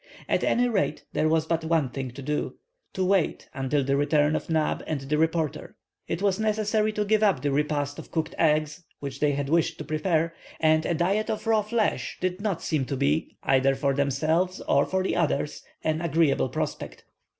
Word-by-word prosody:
At - - +1
any 245 +1 +3
rate 200 -9 -1
there 155 - +2
was 160 0 +2
but 165 0 -1
one 160 -4 +1
thing 130 +1 -4
to 130 +3 -9
do:—to 185 - -4
wait 190 -3 +1
until 135 +1 0
the 135 +1 +1
return 145 +1 +2
of - - -4
Neb 155 -2 +1
and 155 -3 -2
the 140 +3 -1
reporter. 160 -1 -1 0.3
It 170 +4 -3
was 200 0 +2
necessary 215 0 +1
to 210 0 -1
give 215 +1 +2
up 195 -11 +2
the 145 - +1
repast 145 0 -1
of - - -10
cooked 160 -1 -2
eggs 155 +1 +1 0.2
which 140 -1 -6
they 150 -1 +2
had 140 0 -2
wished 165 +1 +1
to - - -6
prepare, 165 +1 0 0.3
and 155 0 +3
a 170 - +1
diet 195 +6 +1
of 215 - -3
raw 220 -1 +3
flesh 210 - -1
did 185 +1 -2
not 200 -5 -2
seem 150 -5 0
to 135 - -3
be, 145 +4 0
either 135 0 +3
for 140 0 0
themselves 155 +7 +1
or - - +2
for 190 0 0
the - - -1
others, 150 -3 0 0.2
an 155 0 0
agreeable 160 -5 +2
prospect. - - -4
160 Hz, 195 wpm, -26 LUFS, 145-185 Hz, 0.3 s, any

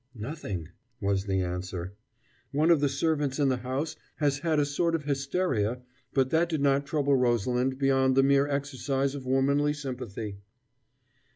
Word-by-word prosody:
"Nothing," 105 - -5 0.3
was 100 -2 0
the 95 -1 0
answer. 90 0 -4 0.6
"One 155 +4 +3
of 165 - +5
the 145 0 +2
servants 145 -1 0
in 145 -2 +3
the 130 - +1
house 135 +6 -3 0.2
has 145 -2 +1
had 155 0 +1
a 145 - +3
sort 165 +4 0
of 155 - -3
hysteria: 135 - -1 0.3
but 130 -1 +1
that 170 +1 +3
did 160 -4 -1
not 140 0 +2
trouble 145 -2 +2
Rosalind 125 +1 +1
beyond 135 -1 +3
the 135 - +5
mere 140 +1 +4
exercise 140 -1 -1
of 135 -3 -7
womanly 140 +3 +2
sympathy." 120 -8 -6
135 Hz, 160 wpm, -28 LUFS, 125-145 Hz, 0.6 s, of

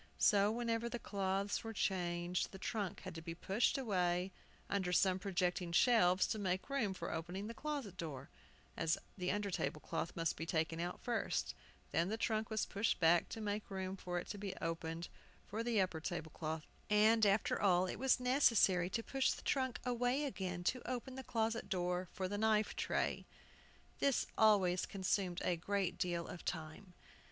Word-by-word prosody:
So, 205 0 +5
whenever 230 0 -1
the 240 - -3
cloths 195 -2 -1
were 225 0 -5
changed, 175 -3 -1
the 195 - -8
trunk 200 -1 -3
had 185 - -7
to 165 - -7
be 165 +1 -6
pushed 195 +10 +1
away 180 -6 0 0.4
under 190 -3 0
some 185 +1 +3
projecting 180 -2 -1
shelves 185 -2 +5
to 215 - -1
make 190 +5 -1
room 220 -9 0
for 170 - -4
opening 175 +5 -4
the 230 - -5
closet 280 - -4
door 140 -5 -6 0.4
(as 165 0 +1 0.2
the 180 -2 -1
under 205 0 -1
table 155 - -1
cloth 165 +2 -3
must 165 -1 0
be 165 - -4
taken 165 0 0
out 175 +1 -3
first), 240 -2 -1 0.4
then 170 +3 +2
the 220 - -1
trunk 220 -1 0
was 220 -1 0
pushed 205 +3 0
back 170 0 +4
to - - -5
make 210 0 -3
room 190 -1 -3
for 180 -2 -4
it 175 - -3
to 205 - -5
be 195 -2 -4
opened 165 0 -3 0.4
for 215 +2 -3
the 230 -2 +1
upper 185 -4 +1
table 165 -2 -4
cloth, 155 0 -4 0.2
and, 215 +2 +5
after 200 0 +3
all, 185 -2 +4
it 185 - -4
was 265 0 +3
necessary 230 -9 +4
to 230 +3 -2
push 270 +2 +1
the - - -3
trunk 260 -2 0
away 250 +3 +1
again 185 -9 -3
to 250 +7 0
open 255 +1 -3
the 265 0 -6
closet 225 -1 -1
door 180 -1 -1
for 185 0 -3
the 205 +2 -3
knife 215 -1 +2
tray. - - -1 0.7
This 275 -2 +2
always 195 -5 +4
consumed 190 -2 -1
a 175 - +1
great 195 +1 -1
deal 170 -1 0
of 175 - -8
time. 160 +3 -5
190 Hz, 180 wpm, -37 LUFS, 175-220 Hz, 0.7 s, So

